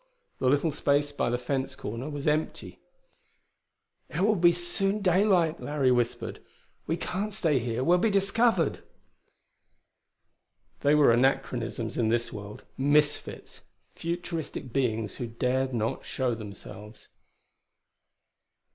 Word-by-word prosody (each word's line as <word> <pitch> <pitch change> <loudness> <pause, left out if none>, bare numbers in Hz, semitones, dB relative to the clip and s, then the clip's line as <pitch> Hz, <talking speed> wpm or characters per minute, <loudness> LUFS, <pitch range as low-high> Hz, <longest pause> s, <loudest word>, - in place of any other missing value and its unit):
The 130 - +2
little 145 +4 +2
space 145 0 +1
by 145 - -1
the 120 - 0
fence 130 +1 -2
corner 115 +7 -5
was 145 -1 -5
empty. 155 +1 -1 1.3
"It - - -3
will 190 -4 +5
soon 185 +4 0
be 210 - -7
daylight," 180 -3 +3
Larry 140 -3 +1
whispered. 120 -1 -1 0.5
"We 165 - 0
can't 200 +5 -3
stay 165 -9 +1
here: 120 +1 -2
we'll 175 +5 +4
be 225 - +2
discovered." 200 -2 +2 2.0
They 145 +1 +3
were 150 -5 +6
anachronisms 120 -2 0
in 110 -2 +2
this 120 +1 0
world; 105 -1 -9
misfits; 145 +2 +1 0.3
futuristic 165 -6 -4
beings 115 -5 -1
who 120 - -4
dared 130 +3 0
not 115 -2 -2
show 130 -2 -1
themselves. 105 0 -10
140 Hz, 120 wpm, -28 LUFS, 120-170 Hz, 2.0 s, were